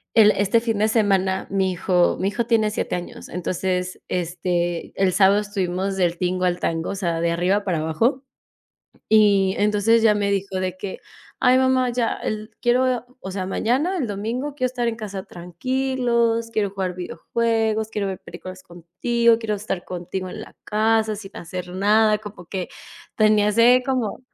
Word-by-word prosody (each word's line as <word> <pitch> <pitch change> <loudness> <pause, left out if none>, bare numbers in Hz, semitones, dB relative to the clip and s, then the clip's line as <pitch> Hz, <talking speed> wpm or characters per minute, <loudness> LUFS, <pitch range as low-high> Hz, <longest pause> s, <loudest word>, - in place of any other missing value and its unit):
el, 215 -2 +7
este, 205 +3 +2
fin 225 -3 -1
de 215 - +3
semana, 195 -4 +1
mi 190 -1 +1
hijo 180 0 +2
mi 195 - +1
hijo 235 +2 -2
tiene 220 -3 +2
7, - - -2
años, 175 - -7
entonces, 180 +1 -2
este, 175 -1 -2
el 185 -1 +3
sábado 195 +2 +5
estuvimos 195 -1 -2
del 175 -2 +1
tingo 185 0 0
al 180 0 0
tango, 165 0 -2
o 200 - -4
sea, 170 -4 -1
de 170 0 +1
arriba 185 +4 +1
para 180 -5 -1
abajo, 225 - 0 0.9
y 200 -3 +4
entonces 210 +2 +3
ya 215 -2 +5
me 200 -1 0
dijo 195 -1 -1
de 185 -1 -2
que: 190 0 -6 0.4
"Ay, 255 0 +5
mamá, 260 -1 +3
ya 235 -1 0
el 215 0 -4
quiero, 250 0 +1
o 190 - -6
sea, 190 -1 -3
mañana, 270 - 0
el 260 - -1
domingo, 230 +8 -3
quiero 255 -3 0
estar 245 -1 -2
en 225 - -2
casa 200 -4 -6
tranquilos, 235 +4 -1
quiero 205 -3 0
jugar 190 -2 -3
videojuegos, 220 +4 -1
quiero 205 -3 -2
ver 190 - -4
películas 185 +2 -10
contigo, 225 +8 +1
quiero 220 -2 -2
estar 195 -3 -4
contigo 185 +1 -5
en - - -7
la - - -13
casa, 220 0 +1
sin 200 -1 -10
hacer 180 +1 -6
nada", 210 +3 +3
como 205 -5 -11
que 185 -1 -4 0.5
tenía 215 -1 +4
ese 240 +4 +5
como 255 -4 -1
205 Hz, 175 wpm, -22 LUFS, 185-230 Hz, 0.9 s, el